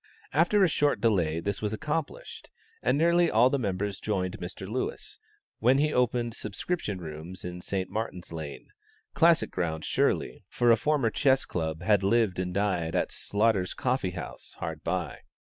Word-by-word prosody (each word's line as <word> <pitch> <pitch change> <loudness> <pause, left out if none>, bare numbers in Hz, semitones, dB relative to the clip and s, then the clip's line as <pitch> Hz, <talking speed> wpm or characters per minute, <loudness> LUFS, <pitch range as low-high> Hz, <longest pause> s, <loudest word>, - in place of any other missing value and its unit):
After 175 +7 +4
a - - +6
short 145 -2 +1
delay 85 -8 +2
this 100 +4 -3
was 105 0 -1
accomplished, 160 - -4 0.3
and - - +2
nearly 170 +2 +4
all 120 +4 +4
the 140 - +1
members 100 -2 -2
joined 95 -3 -2
Mr. 95 +2 -6
Lewis, 120 +6 -4 0.4
when 125 +4 +4
he 150 +1 +2
opened 120 -1 +1
subscription 105 - -3
rooms 85 +2 -8
in 90 0 -6
St. 95 0 -2
Martin's 95 -6 -5
Lane 80 -3 -7 0.4
classic 165 0 +4
ground 80 -3 -2
surely, - - 0
for 120 -1 +3
a - - +8
former 135 -1 +1
Chess 135 +1 +3
Club 80 0 -3
had 100 0 +4
lived 100 -1 +2
and 90 -1 -2
died 90 -4 0
at - - 0
Slaughter's 100 -3 0
Coffee 125 -8 -1
House, 75 - -8
hard - - -5
by. - - -2
105 Hz, 160 wpm, -28 LUFS, 90-130 Hz, 0.4 s, a